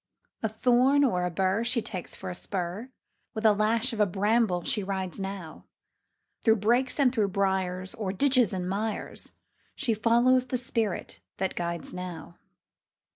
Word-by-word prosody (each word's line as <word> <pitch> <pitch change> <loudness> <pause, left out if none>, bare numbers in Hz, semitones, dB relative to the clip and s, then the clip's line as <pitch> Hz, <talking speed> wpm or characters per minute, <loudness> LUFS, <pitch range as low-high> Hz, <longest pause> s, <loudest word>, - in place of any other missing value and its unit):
A 220 - 0
thorn 250 +5 +3
or 180 -9 +1
a - - -2
bur 190 +5 0
She 240 +1 +1
takes 185 -5 -5
for 190 -1 -6
a - - -4
spur; 185 +5 -4 0.5
With 220 +1 -3
a 215 - +7
lash 220 +3 +1
of 220 - -5
a 210 - +4
bramble 200 -1 +1
she 210 - 0
rides 190 -1 -3
now, 195 -4 -6 0.8
Through 220 -1 +5
brakes 240 +6 +1
and 260 -3 +4
through 215 -5 +2
briars, 190 -1 -1
O'er 205 -4 -3
ditches 250 +1 +3
and 180 -2 -3
mires, 210 +3 -4 0.4
She 250 -6 0
follows 240 +4 +3
the 250 - -1
spirit 230 -5 -3 0.2
that 190 0 -1
guides 170 -1 -4
now. 180 -1 -7
210 Hz, 160 wpm, -28 LUFS, 185-235 Hz, 0.8 s, a